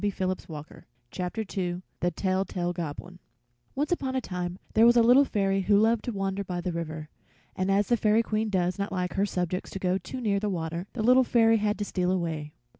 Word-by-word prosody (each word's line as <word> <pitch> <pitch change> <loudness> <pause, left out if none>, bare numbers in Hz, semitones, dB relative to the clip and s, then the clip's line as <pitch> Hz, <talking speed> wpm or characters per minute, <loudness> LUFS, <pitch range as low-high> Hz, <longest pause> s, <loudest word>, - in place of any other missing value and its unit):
THE 205 - +2
TELL 185 -1 -1
TALE - - -18
GOBLIN 150 0 -10 0.4
[Illustration: 180 -1 -3 0.2
The 175 - +1
Tell 190 +1 0
Tale 175 -2 -3
Goblin] 175 +2 -6 0.6
Once 295 +4 -1
upon 265 -6 -1
a - - +2
time 180 -5 -4 0.2
there 225 +1 +6
was 240 0 +5
a 235 - +6
Little 250 +5 +6
Fairy 195 -4 0
who 200 +2 +3
loved 225 +1 +3
to 245 - -2
wander 195 -1 -2
by 180 -2 -4
the 180 +1 -2
river, 160 -2 -5 0.5
and 185 +1 -1
as 200 +1 +2
the 240 - +4
Fairy 215 +1 +3
Queen 215 0 -1
does 180 -1 0
not 200 +1 -2
like 180 -2 -2
her 200 +1 +1
subjects 180 -1 -2
to - - -6
go 185 0 0
too 225 +9 -7
near 205 -5 +1
the 210 +1 -1
water, 170 0 -3
the 225 - -3
Little 255 +3 +6
Fairy 225 -2 +4
had 210 0 0
to 205 - -2
steal 180 -2 -1
away. 160 -5 -2
195 Hz, 225 wpm, -27 LUFS, 180-215 Hz, 0.6 s, there